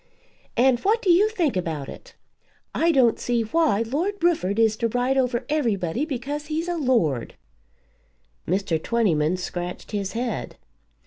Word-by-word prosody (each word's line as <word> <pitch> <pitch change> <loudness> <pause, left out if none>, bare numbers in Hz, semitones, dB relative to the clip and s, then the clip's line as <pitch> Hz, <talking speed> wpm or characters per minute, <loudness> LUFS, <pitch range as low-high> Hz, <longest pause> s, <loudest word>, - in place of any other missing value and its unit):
"And 250 0 +4
what 430 - +2
do 375 - +4
you 395 +5 +5
think 345 - 0
about 160 -6 -3
it? - - -12 0.6
I 335 +1 +3
don't 255 -6 +3
see 240 -1 0
why 230 -3 +2
Lord 315 - -1
Rufford 220 - +1
is 225 -1 +3
to 230 - 0
ride 245 +3 0
over 250 -2 0
everybody 230 - 0
because 290 +1 -4
he's 320 +2 -2
a 350 - -1
lord." 230 - 0 1.1
Mr. 180 -3 0
Twentyman 180 -8 +1
scratched 180 0 -6
his 200 -2 -3
head. 235 -1 -3
240 Hz, 145 wpm, -24 LUFS, 195-300 Hz, 1.1 s, you